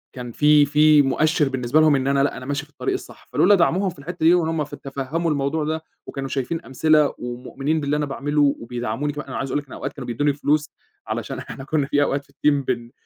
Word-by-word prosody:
كان 125 -2 -6
في 150 +2 +5
في 150 +1 +5
مؤشر 150 +2 +2
بالنسبة 130 +2 +1
لهم 155 -2 +5
إن 135 0 0
أنا 140 0 +3
لأ 140 - -1
أنا 125 - -8
ماشي 145 +1 -2
في 150 - -28
الطريق 390 - -2
الصح، 380 - -8
فلولا 205 - +5
دعموهم 185 +2 +2
في 170 -5 -11
الحتّة 160 +2 -6
دي 170 - +7
وهُم 160 -3 +1
ف 145 - -9
تفهموا 140 +5 -3
الموضوع 145 +2 -1
ده 160 +1 -2 0.2
وكانوا 135 -1 -5
شايفين 150 +6 -3
أمثلة 150 +2 +2
ومؤمنين 135 +5 -3
باللي 145 +1 0
أنا 150 - 0
باعمله 145 +1 +1
وبيدعموني 120 +4 -3
كمان، 150 +1 -7
أنا - - -5
عايز 135 - -3
أقول 145 - +1
لَك 145 - -10
إن - - -18
الأوقات - - -5
كانوا 135 -4 -8
بيدوني 145 +5 +1
فلوس 150 +1 0 0.4
علشان - - -4
إحنا 135 - -8
كنا 145 0 0
في 145 0 +2
أوقات 140 0 -1
في - - -26
الteam 145 -2 +1
بن 120 -2 -3
145 Hz, 230 wpm, -22 LUFS, 135-155 Hz, 0.4 s, دي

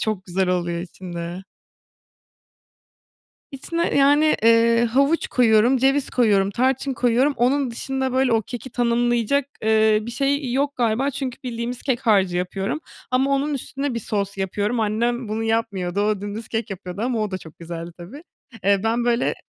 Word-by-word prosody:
çok 210 -4 -2
güzel 185 +1 -1
oluyor 175 -1 -1
içinde. 175 0 -7 2.1
İçine, 335 +5 -2
yani, 290 +2 +4
eee, 230 +1 +5
havuç 275 +7 +2
koyuyorum, 235 +1 +4
ceviz 270 +2 +1
koyuyorum, 205 -5 +2
tarçın 265 +4 0
koyuyorum. 250 +4 +2
Onun 255 +2 +1
dışında, 265 +2 -3
böyle, 260 -1 +2
o 225 -1 +2
keki 245 +3 -8
tanımlayacak, 240 +2 +1 0.2
eee, 220 -1 +4
bir 235 - -6
şey 275 +1 -1
yok 280 +2 0
galiba. 245 +3 +1
Çünkü 260 -2 -5
bildiğimiz 240 0 -4
kek 260 -3 0
harcı 195 -4 +3
yapıyorum 190 - -2 0.3
ama 265 +2 +2
onun 280 +2 0
üstüne 275 0 -3
bir 230 - -2
sos 200 -2 -3
yapıyorum. 205 +4 -1
Annem 235 +2 -1
bunu 220 +1 -2
yapmıyordu. 205 -5 -1
O 210 -1 +1
dümdüz 205 +2 -6
kek 225 -2 -3
yapıyordu 185 0 -7
ama 245 -1 0
o 210 - -2
da 185 - -2 0.2
güzeldi 170 0 -7
tabii. 200 - -10 0.4
Eee, 200 -1 +3
ben 230 +2 +1
böyle 240 0 +1
230 Hz, 155 wpm, -22 LUFS, 200-260 Hz, 2.1 s, eee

